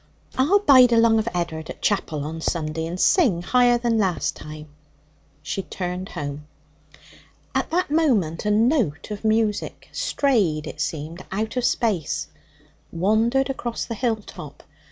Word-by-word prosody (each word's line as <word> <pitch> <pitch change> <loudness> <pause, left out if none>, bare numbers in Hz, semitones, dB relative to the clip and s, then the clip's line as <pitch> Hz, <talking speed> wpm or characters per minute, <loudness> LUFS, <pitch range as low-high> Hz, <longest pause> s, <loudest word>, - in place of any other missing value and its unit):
I'll 295 +10 +4
bide 260 -11 +6
along 230 -1 +5
of 220 - -2
Ed'ard 165 -3 -3
at - - -8
chapel 165 -8 -1
on 160 +2 -5
Sunday, 160 -1 -2
and 175 +2 -5
sing 215 - +3
higher 245 +3 +4
than 235 -2 0
last 190 -4 0
time.' 150 0 -10 0.7
She 155 +6 -3
turned 180 0 -5
home. 145 +1 -6 1.1
At - - -1
that 350 -2 0
moment 225 - +1
a 210 - 0
note 215 - +1
of 210 0 -6
music, 220 -1 0
strayed, 195 - +1
it 155 - -6
seemed, 155 +3 -4
out 215 +4 -2
of 250 -1 0
space, 210 - 0 0.6
wandered 220 +9 +2
across 240 -3 -4
the 230 - -5
hill 230 0 0
top. 215 - -11
210 Hz, 145 wpm, -23 LUFS, 165-240 Hz, 1.1 s, bide